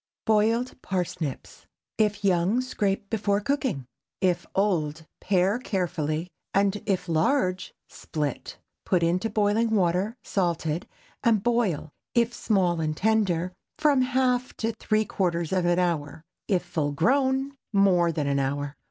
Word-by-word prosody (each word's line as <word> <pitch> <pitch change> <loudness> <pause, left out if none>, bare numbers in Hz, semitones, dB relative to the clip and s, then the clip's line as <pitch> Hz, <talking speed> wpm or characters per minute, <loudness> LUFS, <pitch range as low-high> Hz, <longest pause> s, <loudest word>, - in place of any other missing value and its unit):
BOILED 225 +4 +1
PARSNIPS. 175 -6 -4 0.3
If 210 -1 +1
young, 185 +5 +3
scrape 200 -5 -2
before 205 -2 +1
cooking. 215 - -1 0.3
If 180 -2 +1
old, 160 -6 0
pare 195 +3 +2
carefully, 170 - -2 0.3
and 200 +1 +2
if 185 -2 0
large, 185 - +1 0.2
split. 150 -4 -4 0.3
Put 180 -2 +1
into 180 +6 +1
boiling 215 +2 +2
water, 195 +1 +1
salted, 170 -3 -1 0.4
and 220 -4 +3
boil, 220 -11 0 0.2
if 235 0 +3
small 185 -8 +1
and 155 -1 -2
tender, 190 -5 +1 0.2
from 290 -3 +3
half 255 -1 +1
to 225 0 -1
three 215 0 +1
quarters 170 -4 -1
of 185 -2 +1
an 175 0 +3
hour, 160 -4 -1 0.2
if 190 -4 +1
full 155 -4 -1
grown, 265 - +2 0.2
more 185 -4 +4
than 150 -2 -2
an 140 0 +1
hour. 140 +1 -2
190 Hz, 130 wpm, -26 LUFS, 170-220 Hz, 0.4 s, more